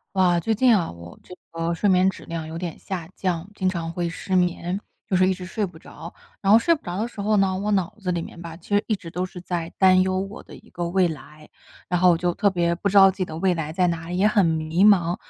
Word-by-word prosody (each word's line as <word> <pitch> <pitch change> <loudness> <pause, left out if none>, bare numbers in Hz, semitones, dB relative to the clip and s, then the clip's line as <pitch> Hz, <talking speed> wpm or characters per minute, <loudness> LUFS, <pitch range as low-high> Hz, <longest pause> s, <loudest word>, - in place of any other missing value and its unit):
哇， 180 -2 +3
最 220 +6 -1
近 245 -2 +5
啊， 175 - -1
我 85 0 -12
这 - - -15 0.2
个 165 0 -2
睡 170 +5 0
眠 185 0 +4
质 - - -12
量 165 -1 -5
有 160 +1 -6
点 170 -3 -5
下 175 -4 -5
降， 180 -1 -2
经 190 -2 -1
常 170 -2 -3
会 175 0 -2
失 185 +3 -4
眠， 180 +1 0 0.3
就 190 - +1
是 185 +1 +4
一 - - +2
直 185 0 -7
睡 210 +3 -2
不 175 -4 -8
着。 165 +1 -11 0.3
然 195 0 +3
后 220 - +9
睡 335 +8 +3
不 305 - -10
着 175 -1 -5
的 225 - 0
时 235 -3 -9
候 210 +1 +1
呢， 195 -2 +2
我 205 +2 -2
脑 190 -4 0
子 185 -2 -2
里 175 -1 -1
面 170 +1 -9
吧， 165 -1 -8
其 175 - -19
实 205 - +2
一 215 - +1
直 175 - -11
都 180 +2 -3
是 185 -1 -8
在 175 -2 -4
担 185 -1 +5
忧 185 0 0
我 195 +4 -6
的 - - -13
一 - - -18
个 175 0 -4
未 185 0 +3
来， 150 -1 -9 0.4
然 180 0 0
后 180 0 +6
我 170 - +2
就 175 0 0
特 200 - +2
别 170 -2 0
不 180 +4 -2
知 200 - -1
道 195 -1 +9
自 190 - -4
己 185 - 0
的 160 -2 -7
未 185 +1 +2
来 155 -2 -4
在 180 +2 +2
哪 165 -1 -3
里， 180 +1 -3
也 200 - +4
很 210 -2 +3
迷 160 +2 +1
茫。 180 -4 +4
180 Hz, 305 characters per minute, -23 LUFS, 170-195 Hz, 0.4 s, 后